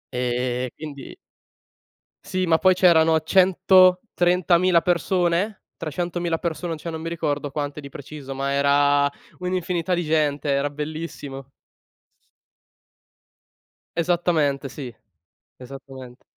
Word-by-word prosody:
E 125 0 -1
quindi 145 -3 -9 1.1
Sì, 185 0 -1
ma 165 -1 +3
poi 185 +1 +4
c'erano 165 -3 +4
130.000 180 -1 +4
persone? 180 +3 0 0.3
300.000 175 +1 -2
persone, 170 0 -3
cioè 170 - -7
non 160 -1 -5
mi 165 - -4
ricordo 145 -4 -2
quante 145 +1 -4
di 140 - -9
preciso, 140 0 -9
ma 140 +1 -2
era 140 0 +3 0.3
un'infinità 180 -1 -2
di 175 -2 -1
gente, 150 -2 0
era 140 +1 +1
bellissimo. 145 -2 -7 2.5
Esattamente, 165 -5 +1
sì. 125 -4 -8 0.6
Esattamente. 130 -1 -11
160 Hz, 100 wpm, -23 LUFS, 140-175 Hz, 2.5 s, poi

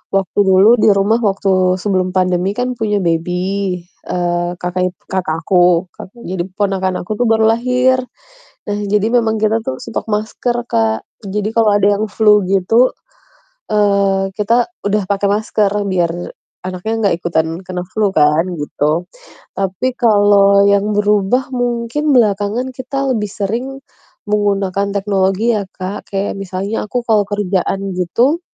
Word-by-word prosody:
waktu 195 +1 0
dulu 195 +4 +5
di 215 - +5
rumah 200 +4 +2
waktu 190 -2 +1
sebelum 185 -1 0
pandemi 185 0 +1
kan 250 0 -1
punya 210 -2 0
baby, 180 +2 -1 0.3
eee, 175 -1 -1
kakak 180 +1 -1
ip - - -40
kakak 180 -4 -2
aku, 180 -1 +3
kan, - - -9 0.2
jadi 185 -1 -2
keponakan 190 -1 -1
aku 175 - -9
tuh - - +3
baru 220 0 +3
lahir. 250 +2 +2 0.7
Nah, 205 0 -1
jadi 205 +1 +1
memang 225 -2 +1
kita 220 +1 +1
tuh 130 - -2
stok 230 - -5
masker, 220 +3 -1
Kak. 110 -1 0 0.2
Jadi, 205 +1 -2
kalau 225 -2 +4
ada 205 -1 +3
yang - - +1
flu 210 -2 +4
gitu, 195 +6 +3 0.8
eee, 200 -2 +1
kita 230 +3 +2 0.2
udah 205 0 +1
pakai 200 0 +1
masker 210 0 +1 0.2
biar 175 -3 +1 0.5
anaknya 185 +4 -4
nggak 180 - +2
ikutan 160 -2 0 0.2
kena 180 -1 -4
flu 205 +3 0
kan, 150 0 +3
gitu. 150 +3 -1 0.5
Tapi 195 +7 -1
kalau 205 -3 +4
yang 200 +1 +2
berubah 210 +5 +1
mungkin 245 +4 -1
belakangan 215 +2 +1
kita 265 +1 -2
lebih 210 -2 -2
sering 235 +6 -4 0.5
menggunakan 200 -1 0
teknologi 195 +3 +1
ya 205 -2 -2
Kak, 190 +3 -7
kayak 195 0 -2
misalnya 195 +3 -4
aku 245 - -1
kalau 220 -2 +4
kerjaan 195 -1 -2
gitu 240 - +1
200 Hz, 145 wpm, -16 LUFS, 185-220 Hz, 0.8 s, dulu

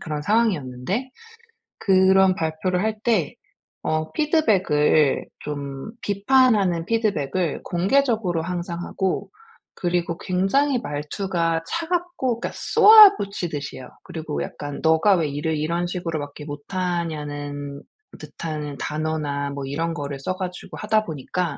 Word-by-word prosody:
그런 150 -2 -4
상황이었는데 195 - 0 0.7
그런 190 -1 +4
발표를 165 +3 -1
할 220 0 0
때 215 -10 +1 0.5
어 155 0 -1
피드백을 190 - +2 0.2
좀 140 +4 -6
비판하는 205 -5 +3
피드백을 185 -7 0
공개적으로 200 -2 +1
항상 175 0 -4
하고 190 0 -2 0.4
그리고 175 -1 -1
굉장히 245 +10 +1
말투가 165 +2 -2
차갑고 335 - -2
그러니까 - - -3
쏘아붙이듯이 395 - +5
해요. 130 - -9 0.2
그리고 155 -2 -4
약간 145 -1 -7
"네가 160 +5 +4
왜 160 -3 0
일을 150 +3 -2
이런 170 +3 -1
식으로밖에 160 -5 -4
못하냐?"는 145 -3 -4 0.4
듯한 150 -3 -6
단어나 150 -2 -2
뭐 140 -1 -5
이런 165 +5 -2
거를 140 -2 -5
써 185 +7 -3
가지고 180 -1 -6
하다 215 0 +1
보니까 160 +1 -3
170 Hz, 285 characters per minute, -23 LUFS, 150-200 Hz, 0.7 s, 쏘아붙이듯이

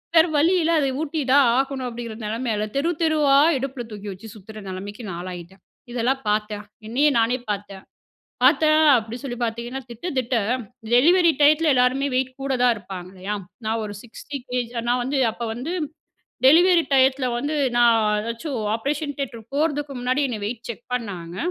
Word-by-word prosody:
வேற 320 - +7
வழி 325 +5 +4
இல்ல, 325 - +1
அத 275 - +1
ஊட்டி 315 0 -2
தான் 280 -2 +6
ஆகணும். 270 -1 -1
அப்டிங்கிற 230 -2 -7
நெலைமையில 220 -1 -2
தெரு, 285 +5 +1
தெருவா 305 -3 +3 0.2
இடுப்புல 260 -1 -4
தூக்கி 205 -1 -7
வச்சு 195 +4 -12
சுத்துற 215 +1 -11
நெலைமைக்கு 200 +5 -7
நான் 170 -2 -5
ஆளாயிட்டேன். 180 +1 -9 0.3
இதெல்லாம் 250 +3 0
பார்த்தேன் 210 0 -1 0.2
என்னையே 275 +7 +3
நானே 230 +2 +2
பார்த்தேன். 200 -1 -6 0.6
பார்த்தேன் 305 +3 +5 0.2
அப்டின்னு 230 +3 -6
சொல்லி 245 -3 -5
பார்த்தீங்கன்னா, 235 +3 -3
திட்ட 235 +10 -6
திட்ட 255 0 0 0.6
டெலிவரி 335 +7 +5
டைத்துல 305 +2 +5
எல்லாருமே 255 +3 +2
வெயிட் 260 0 0
கூட 270 0 -1
தான் 245 -1 +5
இருப்பாங்க 185 -3 -8
இல்லையா? 195 +2 -4 0.3
நான் 225 +1 -1
ஒரு 205 - -6
60kg 250 -1 -5 0.2
நான் 245 +1 +2
வந்து, 270 +3 -1
அப்ப 235 - -7
வந்து 255 +9 -4 0.7
டெலிவரி 345 +4 +6
டையத்துல 265 0 +4
வந்து 290 +5 -2 0.2
நான் 235 -1 +5 0.2
ஏதாச்சும் 235 +5 -4 0.2
ஆப்பரேஷன் 285 +5 -2
தியேட்டர் 235 -5 -5
போறதுக்கு 290 -1 0
முன்னாடி 255 +4 +1
என்னை 225 -4 -4
வெயிட் 235 +2 -6
செக் 235 +1 -8
பண்ணாங்க. 180 -8 -5
245 Hz, 160 wpm, -23 LUFS, 220-280 Hz, 0.7 s, வேற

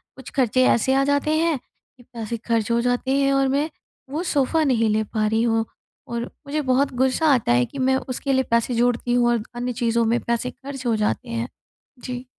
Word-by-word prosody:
कुछ 265 - -10
ख़र्चे 255 -2 +3
ऐसे 265 +3 +2
आ 275 - +3
जाते 285 +2 +1
हैं 330 -2 +2
कि 245 0 -26
पैसे 235 -2 -6
ख़र्च 230 -1 +1
हो 235 - +3
जाते 245 +2 -1
हैं 275 0 +2
और 275 0 +3
मैं 285 +4 0 0.4
वो 310 +5 -3
सोफ़ा 295 +3 +2
नहीं 235 -6 +2
ले 215 +1 +1
पा 215 0 -1
रही 220 +2 +1
हूँ। 225 -1 +1 0.4
और 235 0 -3 0.2
मुझे 300 +2 -1
बहुत 265 0 +1
गुस्सा 265 +5 +2
आता 245 - +1
है 120 0 +4
कि 280 - -9
मैं 265 0 +3
उसके 270 +2 -1
लिए 265 0 +3
पैसे 235 +1 +2
जोड़ती 240 0 +1
हूँ 245 -1 +3
और 235 -3 +1
अन्य 245 +1 -2
चीज़ों 235 -1 +1
में 230 +2 +2
पैसे 235 +1 -1
ख़र्च 270 -1 -9
हो 230 -2 +2
जाते 210 - -1
हैं। 115 +1 -2 0.6
जी। 250 0 -5
245 Hz, 215 wpm, -23 LUFS, 230-270 Hz, 0.6 s, है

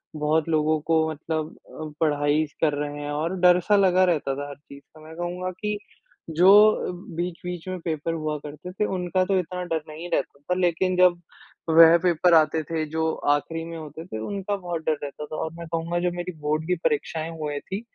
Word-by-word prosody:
बहुत 155 +1 +1
लोगों 155 0 +2
को 160 -1 +3
मतलब 155 +1 -4 0.3
अ, 155 -1 -6
पढ़ाई 145 0 +2
स 150 - -27
कर 155 -2 +3
रहे 145 0 -3
हैं 145 - -4
और 160 +5 -2
डर 180 0 +6
सा 210 - +6
लगा 185 -2 +4
रहता 150 -6 0
था 145 +1 -5
हर 140 - -8
चीज़ 140 -1 -15
का। 155 - -14
मैं 160 +1 -11
कहूँगा 180 +1 -3
कि, 210 +3 -3 0.5
जो 175 +4 +5 0.2
अ, - - -3 0.2
बीच-बीच 175 0 -4
में 185 0 -4
पेपर 160 0 -2
हुआ 155 -2 -2
करते 150 +5 -9
थे, 200 +3 -1
उनका 185 -1 0
तो 195 0 +1
इतना 180 +1 -4
डर 165 -3 -2
नहीं 160 +3 -7
रहता 140 - -1
था 160 +6 -2
लेकिन 180 +1 +1
जब 180 -1 +4 0.5
वह 165 +1 +8
पेपर 175 0 +3
आते 160 0 +4
थे 160 0 -2
जो 160 +1 0 0.2
आखिरी 165 +3 -4
में 165 0 -7
होते 155 +1 -8
थे, 140 - -6
उनका 200 - -3
बहुत 175 -4 -4
डर 155 -2 +1
रहता 145 +1 -6
था। 155 - -7
और 160 0 -3
मैं 170 - -7
कहूँगा 165 +1 -2
जो 180 0 0
मेरी 175 +1 -4
बोर्ड 155 +1 -1
की 180 - +2
परीक्षाएँ 160 +2 0
हुए 145 -2 -3
थीं, 195 +6 -5
165 Hz, 210 wpm, -25 LUFS, 155-180 Hz, 0.5 s, वह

